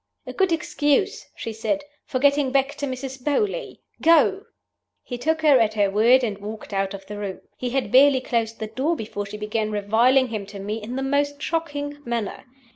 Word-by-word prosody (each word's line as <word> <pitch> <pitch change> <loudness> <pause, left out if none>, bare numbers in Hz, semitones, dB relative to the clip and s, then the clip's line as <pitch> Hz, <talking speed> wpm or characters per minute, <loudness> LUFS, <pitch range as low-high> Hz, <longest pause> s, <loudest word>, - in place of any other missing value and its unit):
'A - - -7
good 380 -2 +1
excuse,' 320 - 0
she 225 - -5
said, 225 +7 -1 0.2
'for 255 - -1
getting 280 0 +3
back 275 +1 +2
to 290 -1 -4
Mrs. 260 0 -6
Beauly. 410 - -1 0.2
Go!' 335 +5 +4 0.6
He 250 - -6
took 315 +4 0
her 290 -4 +6
at 220 -1 +2
her 200 -2 +2
word, 235 +6 +5
and 210 -4 -2
walked 215 +1 -8
out 195 0 -1
of 195 -1 -11
the 205 +1 -7
room. 195 -2 -5
He 250 - -3
had 265 +2 -1
barely 270 +1 +6
closed 230 -3 -1
the 220 - -4
door 260 +10 -1
before 205 -5 -5
she 210 +1 -7
began 215 +1 -2
reviling 230 +6 +3
him 210 -3 -4
to 200 0 -9
me 210 +3 -4
in 230 +4 -6
the 265 - -2
most 285 +1 0
shocking 290 -3 -3
manner. 235 -3 -3
255 Hz, 200 wpm, -23 LUFS, 215-290 Hz, 0.6 s, her